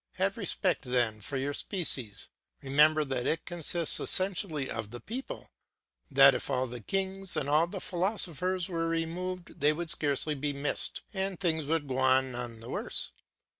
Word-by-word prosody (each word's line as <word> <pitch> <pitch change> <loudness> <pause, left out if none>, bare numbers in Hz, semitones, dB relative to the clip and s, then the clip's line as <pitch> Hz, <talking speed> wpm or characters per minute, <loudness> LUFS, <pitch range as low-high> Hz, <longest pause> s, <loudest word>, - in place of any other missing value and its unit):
Have - - 0
respect - - 0
then 120 -4 +1
for 135 +6 -4
your 140 +2 -2
species; 135 - -1 0.3
remember 150 +3 +4
that 130 -3 -2
it 160 - 0
consists 170 -1 0
essentially 185 -7 +2
of 115 -3 -4
the 120 +2 -8
people, 250 - -7 0.6
that 135 -1 +8
if - - -3
all 130 0 +1
the 125 -1 -7
kings 195 - 0
and 140 - -1
all 155 +3 +3
the 190 +2 -6
philosophers 185 -1 0
were 165 -2 -2
removed 170 +2 -3
they 150 +1 +4
would 170 +1 -3
scarcely 145 +1 +1
be 145 0 -2
missed, 140 +1 -2
and 190 -2 -2
things 160 -5 0
would 155 0 -1
go 130 0 -2
on 130 0 +3
none 120 -2 -6
the 115 - -10
worse. - - -1
150 Hz, 170 wpm, -30 LUFS, 130-175 Hz, 0.6 s, that